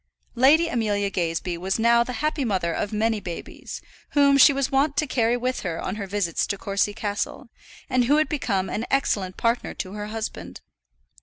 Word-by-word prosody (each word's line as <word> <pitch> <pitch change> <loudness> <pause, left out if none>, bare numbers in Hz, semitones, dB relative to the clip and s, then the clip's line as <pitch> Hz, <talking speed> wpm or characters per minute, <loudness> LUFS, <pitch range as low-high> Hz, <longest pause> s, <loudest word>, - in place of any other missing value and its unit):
Lady 285 +7 +5
Amelia 205 -7 0
Gazebee 170 -1 -2
was 190 +2 -1
now 235 +1 +4
the 250 - -6
happy 305 -2 0
mother 185 -7 0
of 205 - -2
many 220 +1 0
babies, 175 -4 -7 0.3
whom 280 -1 +5
she 275 +2 +8
was 275 0 -1
wont 280 +1 +2
to 305 - +2
carry 240 -3 +1
with 255 +1 -2
her 170 -3 -4
on 190 - -4
her 200 -2 -5
visits 190 -4 -1
to 200 - -2
Courcy 200 +1 0
Castle, 210 +4 -4 0.4
and 255 -2 +2
had 300 +4 +3
become 200 - -1
an 225 - -3
excellent 200 -9 0
partner 230 +1 0
to 185 - -5
her 210 0 -5
husband. 95 - -6
220 Hz, 180 wpm, -24 LUFS, 195-260 Hz, 0.4 s, she